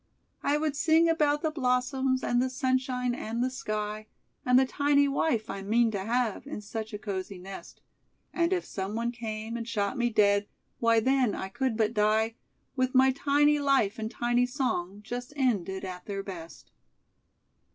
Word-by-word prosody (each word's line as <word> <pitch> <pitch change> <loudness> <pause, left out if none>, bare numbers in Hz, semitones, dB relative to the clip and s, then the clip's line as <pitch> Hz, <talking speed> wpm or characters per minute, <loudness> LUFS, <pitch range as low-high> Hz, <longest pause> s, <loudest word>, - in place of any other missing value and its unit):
"'I 290 +1 +2
would 305 -1 -1
sing 320 +3 +4
about 300 -2 +2
the 315 - +1
blossoms, 260 -1 0
And 245 0 +2
the 260 - 0
sunshine 255 -2 0
and 235 +1 -3
the 255 - 0
sky, 215 -3 -4 0.4
And 250 0 +4
the 265 - +5
tiny 285 +1 +3
wife 275 -5 0
I 195 0 -5
mean 225 +3 +2
to 200 -3 -3
have, 235 +2 -1
In 290 - -5
such 220 +1 -6
a 210 - -4
cosy 195 -2 -5
nest; 190 +2 -10 0.5
And 340 0 +1
if 365 -2 0
someone 215 +5 -3
came 225 -1 -5
and 230 -1 -4
shot 210 +2 -1
me 240 0 +2
dead, 205 -2 +3 0.3
Why, 230 -1 +4
then, 260 -2 +2
I 190 - -5
could 255 +2 -1
but 220 0 +1
die, 215 +1 +2 0.4
With 255 -1 0
my 265 +1 +6
tiny 290 +2 +3
life 270 -7 +2
and 220 0 -3
tiny 240 +1 +1
song 205 - -2
Just 245 +4 -6
ended 200 -8 0
at 180 -1 -8
their 195 -1 -3
best.'" 170 -4 -9
240 Hz, 170 wpm, -28 LUFS, 210-265 Hz, 0.5 s, my